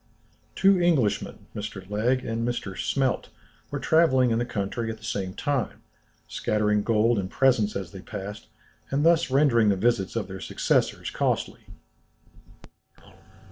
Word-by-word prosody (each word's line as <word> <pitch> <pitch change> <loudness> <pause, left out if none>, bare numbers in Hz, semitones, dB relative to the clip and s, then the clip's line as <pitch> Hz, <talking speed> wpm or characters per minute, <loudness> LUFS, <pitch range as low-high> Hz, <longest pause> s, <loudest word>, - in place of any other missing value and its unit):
Two 195 -1 +4
Englishmen, 150 -12 +1
Mr. 100 -3 -6
Legh 120 +6 0
and 115 0 -2
Mr. 115 -5 -3
Smelt, 135 +3 -1 0.4
were - - -3
travelling 130 -7 +3
in 115 - +1
the 120 - -2
country 115 +1 -3
at 110 - -5
the 110 - -20
same 100 -4 -3
time, 140 -5 -2 0.4
scattering 105 -1 0
gold 115 +1 +2
and 95 -1 -3
presents 120 -5 +2
as 95 -4 -4
they 95 - -9
passed, 105 +2 -7 0.4
and 140 +3 0
thus 165 -3 +4
rendering 130 -5 +4
the 100 - +3
visits 105 -1 0
of 110 -4 -2
their 95 0 -8
successors - - 0
costly. - - -2
115 Hz, 140 wpm, -26 LUFS, 105-130 Hz, 0.4 s, Two